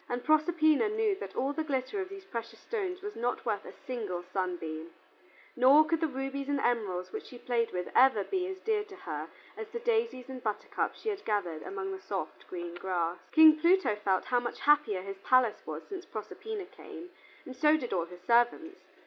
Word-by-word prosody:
And 245 0 -2
Proserpina 310 +3 +4
knew 430 -1 +1
that - - -7
all 270 +2 0
the 315 - -1
glitter 280 +6 -2
of 375 - -5
these 390 -1 -9
precious 230 -7 -6
stones 385 -4 -4
was 415 0 -5
not 240 +1 -2
worth 215 -4 -1
a - - -8
single 210 -9 -3
sunbeam, 175 -3 -3 0.7
nor 275 +5 +7
could 330 +1 0
the 320 - +3
rubies 270 0 -4
and 285 -1 +1
emeralds 210 -8 0
which 435 - -5
she 250 - -11
played 235 -1 0
with 180 -1 -3
ever 255 -6 +6
be 370 - -1
as 380 0 -5
dear 435 -2 +1
to 405 -2 -12
her - - -5 0.3
as 440 - -6
the 470 - -5
daisies 455 - 0
and 260 -1 -7
buttercups 215 -3 -2
she 445 - -1
had 410 -1 -4
gathered 180 -7 -1
among 390 0 -4
the 385 - -5
soft - - -5
green 175 -1 -6
grass. 175 -1 -2
King 315 -1 +8
Pluto 345 - +4
felt 195 -3 0
how 245 - +2
much 240 0 -5
happier 280 -11 +3
his 195 0 -7
palace 250 0 +3
was - - -5
since 380 -3 -7
Proserpina 435 0 -6
came, 360 -2 -11 0.3
and 260 - -8
so 300 +3 +4
did 245 -8 -4
all 175 -3 +1
his 175 +1 -13
servants. 240 - +2
265 Hz, 200 wpm, -31 LUFS, -, 0.7 s, King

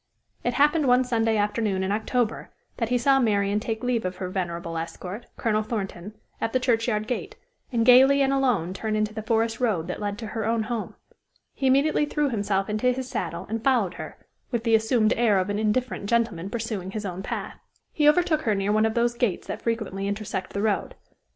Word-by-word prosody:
It - - -1
happened 295 0 +3
one 250 +1 +5
Sunday 225 -3 +1
afternoon 205 -2 0
in 190 - -1
October 225 +2 -1 0.3
that 230 -2 -1
he 245 - +2
saw 270 +2 +4
Marian 205 -3 +2
take 220 0 -4
leave 245 -2 0
of 185 0 -3
her 185 -2 -5
venerable 170 -3 -3
escort, 180 +6 -6
Colonel 215 -2 +1
Thornton, 205 -2 -5 0.3
at 225 - -1
the 255 - +3
churchyard 230 -3 +1
gate, 245 +2 -4 0.4
and 230 -2 +1
gayly 265 +3 +7
and 270 0 +2
alone 245 -11 +1
turn 215 +2 -2
into 215 0 0
the 220 - -4
forest 225 +1 0
road 210 -10 +1
that 180 - -4
led 205 0 -2
to 225 - -6
her 220 -1 -2
own 225 +1 +1
home. 225 0 -4 0.6
He 270 - -1
immediately 295 +3 +3
threw 295 -1 0
himself 200 -3 0
into 215 +4 +1
his 255 0 -4
saddle - - -4
and 225 +1 -3
followed 235 -9 +2
her, - - -8 0.3
with 235 -3 -2
the 230 -1 +1
assumed 220 0 +3
air 225 -4 +3
of 190 +2 0
an 205 - -1
indifferent 220 0 -1
gentleman 220 -6 0
pursuing 215 -5 -4
his 210 +1 -5
own 185 -1 -4
path. - - -5 0.3
He 300 -1 +5
overtook 320 -1 +2
her 220 -7 +1
near 195 +1 0
one 215 +1 +3
of 220 - -3
those 240 0 +2
gates 235 -6 -1
that - - -5
frequently 215 -4 -2
intersect 200 -2 -4
the 200 - -2
road. 215 -2 0
220 Hz, 205 wpm, -25 LUFS, 205-245 Hz, 0.6 s, gayly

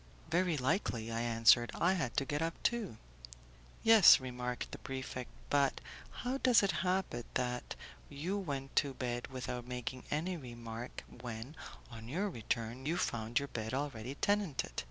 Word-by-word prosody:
"Very 175 -2 +2
likely," 125 - 0
I 115 0 -1
answered; 120 0 +5
"I 180 +3 +3
had 155 -10 -2
to 135 - +3
get 145 +2 -2
up, 165 0 0
too." 225 - 0 0.9
"Yes," 225 -4 +9
remarked 125 -1 -4
the - - -7
prefect; 130 -1 -5 0.2
"but 140 -1 +3 0.5
how 260 +2 0
does 245 -6 +5
it 195 - +3
happen 185 -10 0
that 125 -1 -1 0.3
you 170 +8 -3
went 140 -7 -4
to 140 -3 +3
bed 120 -1 -3
without 125 -2 -5
making 125 +1 -5
any 170 +5 -1
remark 120 -3 -7
when, 120 +3 -7 0.4
on 115 -1 -9
your 190 +10 -1
return, 115 +1 -3
you 165 +3 +1
found 115 0 -1
your 140 0 +1
bed 110 +1 -3
already 135 -2 -3
tenanted? 200 -5 0
130 Hz, 155 wpm, -34 LUFS, 120-165 Hz, 0.9 s, Yes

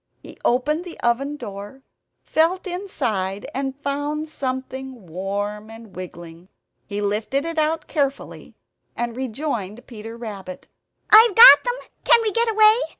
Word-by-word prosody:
He - - -12
opened 295 +7 +1
the 350 -2 -10
oven 275 +5 0
door, 205 +2 -9 0.4
felt 335 +5 +1
inside, 215 - -3
and 270 +1 -4
found 290 +2 -2
something 260 -4 -5
warm 200 +5 -4
and 225 -2 -13
wriggling. 175 -1 -10 0.4
He 205 0 -4
lifted 215 +8 -1
it 330 -1 -2
out 310 +1 0
carefully, 280 -3 -3 0.4
and 240 -1 -3
rejoined 245 -4 -4
Peter 225 -1 -9
Rabbit. 200 -6 -8 0.5
"I've 435 -1 +8
got 475 +2 +10
them! - - -1 0.3
Can - - +6
we 435 - 0
get 465 +2 +1
away? 435 0 +5
260 Hz, 135 wpm, -22 LUFS, 210-310 Hz, 0.5 s, got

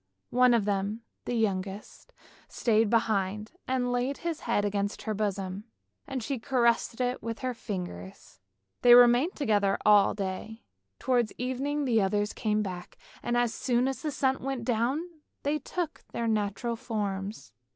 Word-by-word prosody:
One 250 0 +5
of 220 -4 +1
them, 205 +2 -1 0.2
the 245 - -2
youngest, 200 - -3 0.4
stayed 225 -2 +2
behind. 215 -2 0 0.2
He 260 - +1
laid 245 +2 0
his 335 -2 -1
head 205 - 0
against 200 0 -2
her 215 - -2
bosom, 200 -1 -3 0.4
and 265 -4 -3
she 265 +1 -2
caressed 235 -2 +1
it 250 0 -1
with 230 0 -5
her 255 -1 -2
ringers. 95 - -6 0.4
They 240 0 +9
remained 245 +7 +6
together 205 -8 +2
all 205 -1 +6
day; 200 +3 -5 0.3
towards 245 -4 +1
evening 275 +4 -1
the 230 -4 +3
others 205 +2 0
came 215 -1 0
back, 180 -3 -7 0.2
and 240 0 0
as 240 -2 +2
soon 250 0 +1
as 270 - -3
the 310 - -2
sun 265 -2 0
went 265 -3 -3
down 250 +8 0 0.4
they 295 +2 0
took 330 +3 -4
their 235 - -2
natural 220 +2 -1
forms. 205 - -4
230 Hz, 150 wpm, -29 LUFS, 205-250 Hz, 0.4 s, They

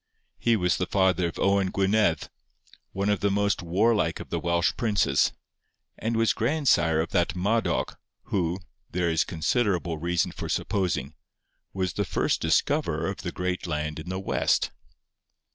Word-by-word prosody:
He 115 -1 +3
was 90 -4 +1
the 90 - -1
father 95 -2 +2
of 85 - -7
Owen 100 -1 +2
Gwynedd, 95 -4 +1 0.6
one 100 +1 -1
of 105 -2 +2
the 100 - +1
most 100 0 +1
warlike 105 +6 +1
of - - -9
the - - 0
Welsh 85 -1 +1
princes, 110 -5 +2 0.6
and 115 +1 -2
was 115 0 +3
grandsire 115 - +2
of 85 - -4
that 90 -1 +1
Madoc 105 +6 0 0.2
who, 90 -2 -1 0.3
there 85 -1 0
is 80 - +2
considerable 85 -1 0
reason 85 +2 0
for - - -6
supposing, 80 -8 -1 0.6
was 95 -3 -2
the - - 0
first - - 0
discoverer - - +1
of - - -7
the - - -5
great 90 0 -3
land 75 -1 -2
in 80 +3 -8
the 95 0 -3
West. 95 - +1
95 Hz, 155 wpm, -26 LUFS, 85-100 Hz, 0.6 s, He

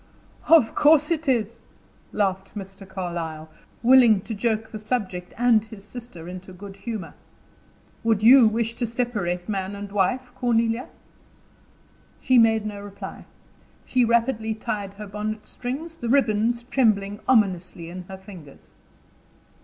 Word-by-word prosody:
"Of 315 -9 +6
course 300 +1 +4
it 320 -2 -1
is," 230 -4 0 0.5
laughed 190 -1 -1
Mr. 195 -1 -9
Carlyle, 170 -4 -5 0.3
willing 240 -5 +6
to 225 - -6
joke 220 +1 -1
the 215 - -6
subject 205 -6 -3
and 235 -2 +4
his 220 -2 -12
sister 215 -7 -10
into 185 +1 -9
good 195 +2 -10
humor. 200 -3 -6 0.9
"Would 225 -2 +1
you 245 0 +8
wish 225 +1 -1
to 240 - -1
separate 215 -7 -2
man 195 -1 -3
and 200 0 -7
wife, 240 +6 0
Cornelia?" 235 -1 0 1.3
She 255 -2 +4
made 225 -1 +4
no 205 -1 -5
reply. 200 -1 -9 0.6
She 250 -1 +2
rapidly 230 -1 +1
tied 205 -2 -4
her 210 +1 -8
bonnet 210 +1 -5
strings, 290 +7 -6
the 235 - -4
ribbons 235 -2 +2
trembling 210 -5 +1
ominously 185 -8 +1
in 180 +1 -7
her 190 +1 -9
fingers. 185 -7 -14
215 Hz, 135 wpm, -24 LUFS, 195-240 Hz, 1.3 s, you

